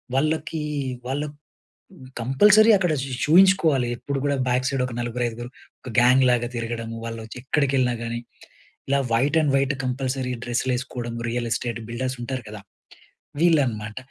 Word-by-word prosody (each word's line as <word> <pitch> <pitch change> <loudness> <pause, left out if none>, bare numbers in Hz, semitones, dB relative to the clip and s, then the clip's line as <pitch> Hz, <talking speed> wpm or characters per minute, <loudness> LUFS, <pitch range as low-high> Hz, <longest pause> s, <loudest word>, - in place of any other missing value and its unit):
వాళ్ళకి 155 +3 0 0.5
వాళ్ళు 145 +3 -2 0.9
కంపల్సరీ 205 - +5
అక్కడ 180 -4 +1
చూ 135 - -5 0.2
చూయించుకోవాలి. 160 -6 +4
ఎప్పుడు 140 +3 -4
కూడా 140 -1 +1
బ్యాక్ 125 +1 +1
సైడ్ 135 -2 -1
ఒక 125 - -7
నలుగురు, 120 +1 -3
ఐదుగురు 120 +1 -7 0.3
ఒక 130 - -8
గ్యాంగ్ 125 +2 +6
లాగా 120 -1 +1
తిరగడము, 115 -1 -4
వాళ్ళోచి 115 0 -7
ఎక్కడికెళ్ళినా 135 -2 +1
గాని, 120 0 -3 0.7
ఇలా 140 +1 +2
వైట్ 135 +7 +2
అండ్ 145 -3 +1
వైట్ 135 +1 +1
కంపల్సరీ 130 0 -2
డ్రెస్‌లు 125 +1 -1
ఎసుకోవడం. 120 -2 -5
రియల్ 120 0 -2
ఎస్టేట్ 120 -1 -2
బిల్డర్స్ 130 +2 -3
ఉంటారు 130 0 -4
కదా! 105 -1 -8 0.8
వీళ్ళనమాట. 125 -11 +1
130 Hz, 140 wpm, -23 LUFS, 120-140 Hz, 0.9 s, గ్యాంగ్